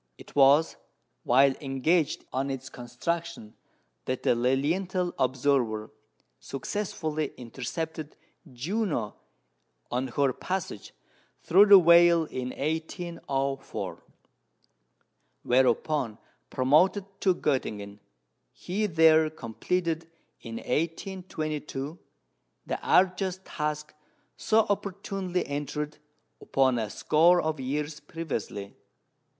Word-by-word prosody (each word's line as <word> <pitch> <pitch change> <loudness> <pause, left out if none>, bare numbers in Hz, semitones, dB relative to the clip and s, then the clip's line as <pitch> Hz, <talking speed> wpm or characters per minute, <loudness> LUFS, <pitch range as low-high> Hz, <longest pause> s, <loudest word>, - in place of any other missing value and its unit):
It - - -15
was 145 +3 +5 0.4
while 135 +2 +4
engaged 145 +4 0
on 135 +1 -1
its 135 0 -5
construction 125 +1 -4 0.5
that 130 0 -3
the - - +4
Lilienthal 165 +9 0
observer 130 -4 +1 0.5
successfully 155 -1 -3
intercepted 150 +6 -6 0.3
Juno 150 - -2 0.8
on 125 +2 -1
her 135 +1 +1
passage 180 - -5 0.5
through 195 +5 +6
the 200 -1 +10
Whale 170 -1 +6
in 130 -4 -5
1804; 150 -3 -3 1.4
whereupon 130 -1 +1 0.3
promoted 155 +10 +3 0.2
to 185 -2 +3
Göttingen, 105 -9 -2 0.5
he 210 +4 -2
there 160 -2 +5
completed, 160 +5 -3 0.3
in 115 0 -8
1822, 155 -1 -3 0.7
the - - -3
arduous 185 0 +2
task 150 0 -4 0.4
so 225 +1 +3
opportunely 195 -2 -2
entered 150 +1 -4 0.4
upon 130 -3 +2
a 110 -2 -2
score 170 - +4
of 155 -3 -1
years 150 +3 -3
previously. 115 - -5
150 Hz, 90 wpm, -28 LUFS, 130-175 Hz, 1.4 s, the